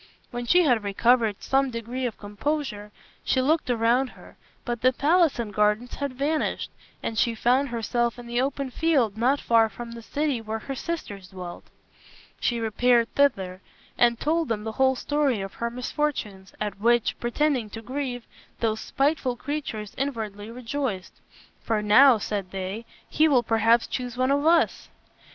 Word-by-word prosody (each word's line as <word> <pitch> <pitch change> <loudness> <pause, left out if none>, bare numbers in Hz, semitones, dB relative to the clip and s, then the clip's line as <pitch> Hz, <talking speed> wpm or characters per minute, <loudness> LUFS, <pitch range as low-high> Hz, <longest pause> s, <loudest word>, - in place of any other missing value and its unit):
When 240 -1 -5
she 360 +8 +5
had 245 -8 +2
recovered 220 +1 +2
some 270 0 +2
degree 245 +2 -3
of 230 - -7
composure 210 0 -3 0.3
she 260 - +1
looked 300 +2 +1
around 240 +2 +2
her, - - -15 0.3
but 240 -1 -3
the 255 - +5
palace 315 +4 +3
and 225 -3 -4
gardens 210 +4 +1
had 280 -2 -3
vanished, 300 +4 -1 0.3
and 220 -2 -2
she 235 -1 +2
found 255 +5 +2
herself 235 +1 -1
in 245 - -9
the 240 +1 0
open 275 0 -2
field 270 -9 +1
not 255 +5 +2
far 225 -1 +3
from 235 +3 -8
the 235 0 -8
city 280 +1 -1
where 220 0 -4
her 270 +5 -6
sisters 240 - -5
dwelt. 180 -1 -9 0.7
She 240 -1 0
repaired 235 +1 +2
thither 190 -10 +1 0.3
and 235 -1 +3
told 320 +1 +1
them 215 -2 -2
the 220 - -3
whole 265 +3 +2
story 285 -3 0
of 195 0 -5
her 235 - -3
misfortunes, 240 -6 -3
at 210 -2 -3
which, 235 +1 +2
pretending 245 -1 0
to 225 +2 -8
grieve, 250 -1 -4 0.3
those 220 -1 0
spiteful 275 0 0
creatures 250 -7 -5
inwardly 220 -6 -3
rejoiced. 235 -4 -4 0.5
"For 220 -2 -1
now," 245 +4 +7
said 200 -3 -3
they, 195 +4 -5 0.2
"he 315 - +3
will 260 -5 +4
perhaps 225 +1 +3
choose 250 -1 -5
one 255 +1 +2
of 285 +1 +2
us." 335 0 +2
240 Hz, 165 wpm, -25 LUFS, 220-275 Hz, 0.7 s, now